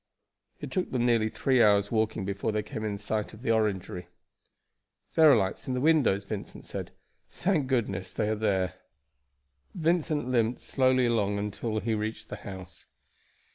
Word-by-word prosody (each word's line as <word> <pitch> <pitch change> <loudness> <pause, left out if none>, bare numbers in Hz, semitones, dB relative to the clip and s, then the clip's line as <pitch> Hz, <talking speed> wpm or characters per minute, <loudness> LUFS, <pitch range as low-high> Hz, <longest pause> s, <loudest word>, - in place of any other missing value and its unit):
It - - -7
took 185 -2 -1
them 120 -2 0
nearly 115 -2 +3
three 130 +2 +2
hours' 100 -2 +4
walking 110 -3 0
before 100 +3 -2
they 105 0 -1
came 110 - -6
in 105 -2 -2
sight 105 +1 -3
of 110 - -14
the 115 - +1
Orangery. 95 -5 -1 1.1
"There 160 -2 +7
are - - +7
lights 95 -4 -1
in 130 - -1
the - - 0
windows," 140 -9 +3
Vincent 100 0 -7
said. - - -5 0.4
"Thank 170 -8 0
goodness 100 -8 -1
they 105 - -1
are 110 - +1
there." 95 -4 0 1.0
Vincent 160 -4 +1
limped 120 -1 +1
slowly 130 -1 +2
along 105 -4 +1
until 105 +2 -2
he 115 - -1
reached 110 +1 -3
the - - -5
house. 95 -2 -10
110 Hz, 165 wpm, -28 LUFS, 100-130 Hz, 1.1 s, There